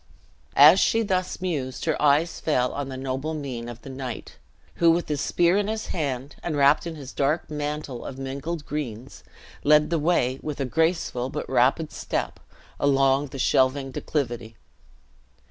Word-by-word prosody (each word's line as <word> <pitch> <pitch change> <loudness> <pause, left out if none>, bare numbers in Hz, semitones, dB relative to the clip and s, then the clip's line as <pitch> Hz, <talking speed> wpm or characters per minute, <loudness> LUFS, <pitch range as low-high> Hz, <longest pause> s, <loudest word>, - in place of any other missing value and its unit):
As 155 +7 +9
she 225 0 +3
thus 185 -3 -1
mused 145 -8 -3
her 160 - 0
eyes 150 +3 +3
fell 125 -5 +1
on 140 -1 -4
the 130 - -6
noble 135 +4 -3
mien 125 -5 -5
of 120 -1 -10
the - - -9
knight, 130 -3 -7 0.4
who, 170 - +5
with 170 +1 +2
his 145 -2 -1
spear 175 +2 +2
in 205 0 0
his 220 0 -3
hand, 140 -4 -3
and 160 -4 -2
wrapped 140 +4 +4
in 165 - -5
his 140 -3 -9
dark 150 +3 0
mantle 150 -4 -4
of 130 - -7
mingled 140 +4 -5
greens, 130 -4 -6 0.4
led 150 +2 +4
the 165 - +2
way, 135 -5 +1
with 150 -2 -5
a 135 - 0
graceful 160 -3 0
but - - -5
rapid 135 +5 +2
step, - - -3 0.4
along 135 0 +3
the 135 - -9
shelving 135 +1 +2
declivity. 120 -6 -3
145 Hz, 165 wpm, -25 LUFS, 130-160 Hz, 0.4 s, As